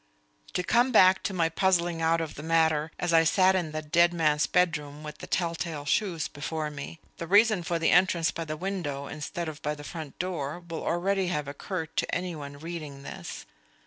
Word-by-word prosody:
To 180 - 0
come 240 +6 +3
back 185 -4 +6
to - - 0
my 170 -3 +1
puzzling 170 -1 +1
out 165 +1 +2
of 155 -2 -4
the - - -8
matter 160 -1 +2
as 175 -1 -1
I 165 0 +6
sat 185 +3 +4
in 175 -4 -1
the 155 0 -4
dead 170 +3 +3
man's 150 -3 +2
bedroom 150 -4 0
with 150 0 -8
the - - -8
tell 170 -2 0
tale 160 -3 -4
shoes 170 0 0
before 150 +1 -4
me: 150 +3 -8 0.2
the 170 - -5
reason 210 +1 +5
for 170 0 -1
the 165 - +2
entrance 175 -2 +4
by 165 - -5
the 155 0 -4
window 165 -6 -3
instead 160 +4 -5
of 155 -1 -7
by 150 +1 -2
the 145 - -10
front 155 -2 -7
door 175 -4 -3
will 165 -1 -5
already 190 +2 0
have 150 -5 -2
occurred 160 +3 -5
to - - 0
any 180 -1 -3
one 140 -2 -8
reading 155 -3 -7
this. - - -7
165 Hz, 210 wpm, -28 LUFS, 150-180 Hz, 0.2 s, back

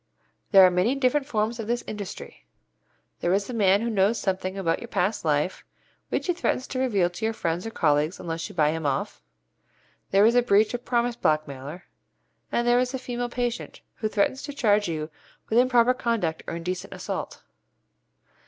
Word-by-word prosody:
There 195 -2 +8
are 180 - +5
many 185 +9 +2
different 275 +1 +1
forms 225 -2 -1
of 220 - -4
this 240 +1 -1
industry. 205 -3 -7 0.8
There 175 - 0
is 200 0 0
the 250 - -6
man 200 -2 +3
who 235 - -1
knows 205 +2 +2
something 190 0 -2
about 170 -4 0
your - - -8
past 205 +4 -1
life, 150 +3 0 0.5
which - - -1
he 355 - +1
threatens 300 -6 -1
to 255 - -3
reveal 210 -9 +2
to 175 - -9
your 225 0 0
friends 170 +3 -2
or - - -3
colleagues 155 -3 +1
unless 165 -1 -4
you - - -12
buy 150 -3 +3
him 160 -2 -2
off. 135 -1 -2 0.9
There 195 +2 +5
is 230 - +5
the 245 - +5
breach 215 -1 +3
of 245 0 -4
promise 240 -1 +1
blackmailer, 155 - -2 0.7
and 240 0 0
there 240 0 +5
is 250 +1 0
the - - -1
female 245 -1 -4
patient, 240 -1 -3 0.2
who 215 - -1
threatens 215 +6 0
to 285 - -6
charge 210 -6 +2
you 155 -1 -4 0.4
with 225 - +4
improper 250 -1 +4
conduct 225 -10 -1
or - - -4
indecent 180 +2 -4
assault. - - -5
210 Hz, 190 wpm, -25 LUFS, 175-240 Hz, 0.9 s, There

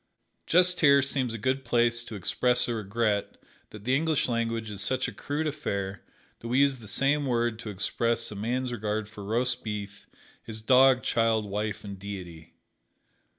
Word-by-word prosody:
Just 180 +1 +4
here 140 -3 +6
seems 130 -3 -1
a 115 - -4
good 130 +4 -1
place 120 -1 +1
to 110 - -8
express 125 +6 +2
a 120 - -1
regret 105 -1 -1 0.3
that 105 -1 -11
the 130 +4 +2
English 155 +1 +1
language 115 -2 -2
is 100 -1 -5
such 130 +6 +1
a - - -5
crude 150 +2 -3
affair 100 -10 -3 0.4
that 115 - -8
we 125 +2 0
use 140 -1 +4
the 110 -3 -12
same 140 +7 +1
word 120 -2 0
to 115 - -6
express 115 +4 -1
a - - -7
man's 125 +5 -2
regard 110 -2 -2
for 105 -1 -10
roast 120 +4 -1
beef, 105 -2 -6 0.3
his 110 -1 -9
dog, 130 +1 +5
child, 115 -2 +1
wife 105 +1 -3
and 100 -2 -8
Deity. 90 -5 -9
115 Hz, 175 wpm, -27 LUFS, 105-130 Hz, 0.4 s, here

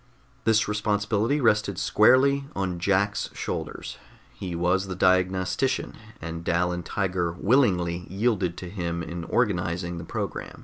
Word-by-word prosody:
This 110 -1 +3
responsibility 105 +4 0
rested 105 -6 +2
squarely 135 +8 +4
on 90 -3 -2
Jack's 100 +2 +1
shoulders; - - -5 0.3
he 90 -3 -5
was 90 +3 +1
the 95 - -4
diagnostician, 95 +7 +1 0.3
and 85 0 -6
Dal 85 +1 +1
and 90 0 -4
Tiger 90 -3 -1
willingly 90 -6 +2
yielded 95 -3 0
to 90 - -7
him 85 -3 -3
in 85 +1 -6
organizing 85 -6 -1
the - - -7
program. - - -5
95 Hz, 130 wpm, -26 LUFS, 85-105 Hz, 0.3 s, squarely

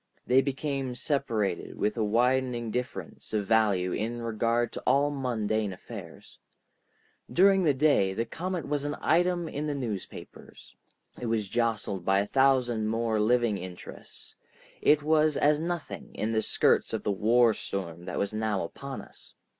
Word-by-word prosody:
They 130 +2 +5
became 135 -1 -3
separated 120 - -1
with 105 - 0
a 115 - 0
widening 120 +1 +1
difference 125 -2 -5
of 105 -2 0
value 100 -5 +2
in 115 +5 -2
regard 115 +1 0
to - - -5
all 145 +1 +2
mundane 110 -6 -1
affairs. 90 - -11 0.9
During 195 +1 +5
the 150 -6 +3
day, 130 -10 +3
the 115 - -1
comet 175 +6 -4
was 145 -1 -1
an 145 0 -2
item 175 +1 +2
in 150 0 -4
the 145 - -2
newspapers, 115 -8 -7 0.5
it 120 - -3
was 110 -3 0
jostled 110 -4 -1
by 95 +2 +3
a 100 - +1
thousand 125 -3 +2
more 115 0 0
living 115 -1 +2
interests, 90 -1 -10 0.5
it 150 -1 +4
was 155 -1 +3
as 150 +1 +3
nothing 170 -2 -5
in 110 - -1
the 110 -1 +1
skirts - - +2
of - - -2
the - - 0
war 115 +3 +4
storm 85 -4 -5
that 90 - -5
was 100 +1 -1
now 110 -3 -1
upon 135 +10 -7
us. - - -17
120 Hz, 155 wpm, -28 LUFS, 105-140 Hz, 0.9 s, They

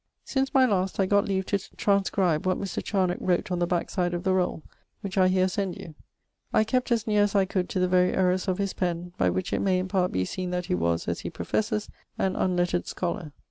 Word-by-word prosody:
Since 270 0 -1
my 260 -1 +7
last 195 -5 0
I 195 - +4
got 200 +1 +3
leave 190 -1 -1
to 200 - 0 0.2
transcribe 190 -4 +1
what 185 - +2
Mr. 195 -3 -4
Charnocke 185 -3 0
wrote 180 0 0
on 180 - 0
the 175 - +1
backside 175 0 -1
of 175 - -4
the 190 - +2
rolle, 180 -4 0 0.4
which 195 -1 -5
I 185 -2 +5
heer 185 0 +3
send 190 -1 -2
you. 160 - -9 0.6
I - - +4
kept 255 +3 -1
as 225 -2 +2
neare 210 -1 +2
as 205 0 +1
I 195 -1 +4
could 185 -1 -2
to 185 - -1
the 185 - +3
very 180 0 +3
errours 185 +1 +1
of 185 -1 0
his 200 -1 -1
pen, 175 -1 -3
by - - +3
which 185 - -2
it - - +1
may 190 -2 +2
in 185 +1 -1
part 185 -2 +1
be 95 - 0
seen 185 - -4
that 180 0 -2
he - - -1
was, 85 -1 0
as - - -1
he - - -5
professes, 215 -1 -2 0.3
an 190 0 0
unlettered 175 -1 0
scholar. 170 -3 -3
185 Hz, 240 wpm, -26 LUFS, 180-200 Hz, 0.6 s, my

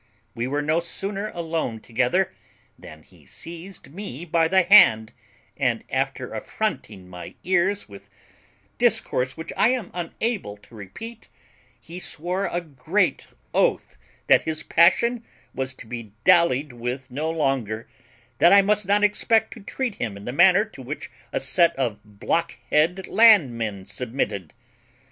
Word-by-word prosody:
We 120 0 -3
were 145 +2 -1
no 155 +3 +1
sooner 195 +4 -4
alone 160 -9 -3
together 125 - 0 0.4
than 80 0 -13
he - - -22
seized 170 -2 -10
me 175 -5 -7
by 165 -1 +2
the 190 +2 +3
hand, 110 - +6 0.4
and, - - 0
after - - -2
affronting 95 -2 -4
my 90 -1 -10
ears 190 +3 +1
with 100 -1 -14 0.7
discourse 130 +2 +1
which 160 - -7
I 225 - +4
am 250 -6 -2
unable 180 - -3
to 100 +2 -22
repeat, 215 - -10 0.5
he 170 +2 -10
swore 180 +3 -2
a 175 - -2
great 165 +5 -1 0.3
oath - - 0 0.3
that - - +5
his 155 -1 -3
passion 230 +8 +3 0.3
was 130 0 -4
to - - -11
be 115 -3 -8
dallied 145 -5 +3
with 125 +2 -5
no 150 +5 -2
longer; 135 -9 -1 0.5
that 170 - +6
I 200 0 +7
must 210 -1 +1
not 205 +1 +3
expect 220 +2 +2
to - - -12
treat 235 +3 -4
him 110 -4 -4
in 100 - -11
the 120 - -4
manner 185 +6 +5
to 215 -11 -13
which 135 +4 -7 0.2
a - - -1
set 170 +5 +3
of 120 -6 -2
blockhead 165 - -1
land 210 - +5
men 105 -4 -4
submitted. 100 - -4
160 Hz, 145 wpm, -23 LUFS, 120-190 Hz, 0.7 s, I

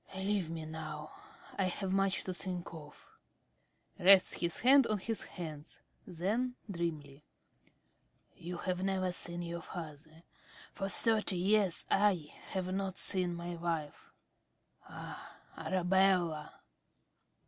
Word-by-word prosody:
Leave 190 -2 0
me 165 -1 -5
now. 155 -1 -6 0.5
I 195 - +3
have 185 +1 -2
much 195 -1 +2
to 185 - -3
think 180 -2 -5
of. 150 -2 -11 0.9
(Rests 190 +1 +7
his 170 -1 -1
head 265 +1 +7
on 215 - +1
his 225 +3 -3
hands. 155 -3 -8 0.3
Then, 220 +9 -1
dreamily.) 155 -6 -4 1.1
You 175 +1 -6
have 185 +1 -2
never 190 -1 +1
seen 175 0 -2
your 170 0 -4
father; 160 -1 -9 0.5
for 195 -1 -3
thirty 215 0 +3
years 195 -1 +2
I 195 -7 +2 0.2
have 185 -1 -2
not 195 -1 -2
seen 180 -3 +1
my 170 +1 -5
wife.... 165 -3 -3 0.8
Ah, - - -9 0.2
Arabella! 180 -4 +1
180 Hz, 115 wpm, -33 LUFS, 165-195 Hz, 1.1 s, Rests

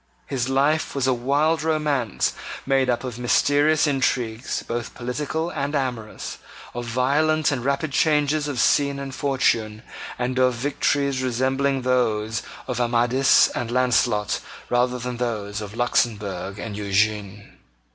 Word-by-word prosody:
His 130 -2 -2
life 140 +4 +1
was 135 -2 0
a 130 - +3
wild 145 +6 +1
romance 150 - 0 0.3
made 135 -1 +2
up 120 +1 0
of 125 -2 -6
mysterious 145 +5 +3
intrigues, 125 -5 -1
both 120 0 -4
political 150 +7 -3
and 145 -1 -2
amorous, 125 -6 -4 0.3
of 120 0 -5
violent 145 +6 +2
and 130 -4 -2
rapid 140 +3 -1
changes 150 0 +2
of 140 -4 -3
scene 140 +2 +3
and 135 -1 -6
fortune, 115 -6 0 0.3
and 125 +1 -1
of 130 -1 +3
victories 140 +1 0
resembling 130 +2 0
those 110 -4 +1 0.3
of 125 -1 -2
Amadis 120 +3 +4
and 120 -1 -4
Launcelot 120 -4 +1 0.3
rather 125 +1 +2
than 125 0 -5
those 105 -4 -3
of 105 0 -7
Luxemburg 105 -6 -1
and 105 0 -6
Eugene. 100 0 -1
125 Hz, 135 wpm, -23 LUFS, 115-140 Hz, 0.3 s, Amadis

